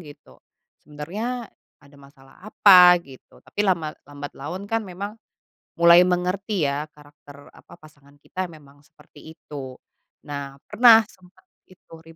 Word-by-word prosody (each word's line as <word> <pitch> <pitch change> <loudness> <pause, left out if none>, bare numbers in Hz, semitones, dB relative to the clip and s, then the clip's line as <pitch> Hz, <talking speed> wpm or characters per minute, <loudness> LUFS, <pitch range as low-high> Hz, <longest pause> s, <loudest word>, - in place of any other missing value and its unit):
gitu. 145 -3 -16 0.4
Sebenernya 205 - -7 0.3
ada 140 0 -20
masalah 140 0 -20
apa? 180 -4 +7
Gitu. 130 -2 -17
Tapi 205 - -6
lama 170 -6 0 0.2
lambat 145 0 -9
laun, 180 +8 -7
kan, 225 +2 -2
memang 200 +4 -7 0.7
mulai 170 +1 +6
mengerti, 180 +1 -2
ya, 145 +2 -3
karakter 145 -1 -17
apa - - -19
pasangan 145 -2 -21
kita - - -12
memang 145 -4 -17
seperti 150 - -21 0.2
itu. 135 -5 -10 0.5
Nah, 140 -1 -7
pernah 225 +1 +6
sempat 185 0 -23 0.2
itu 185 -2 -21
rib 165 0 -17
165 Hz, 135 wpm, -22 LUFS, 145-185 Hz, 0.7 s, apa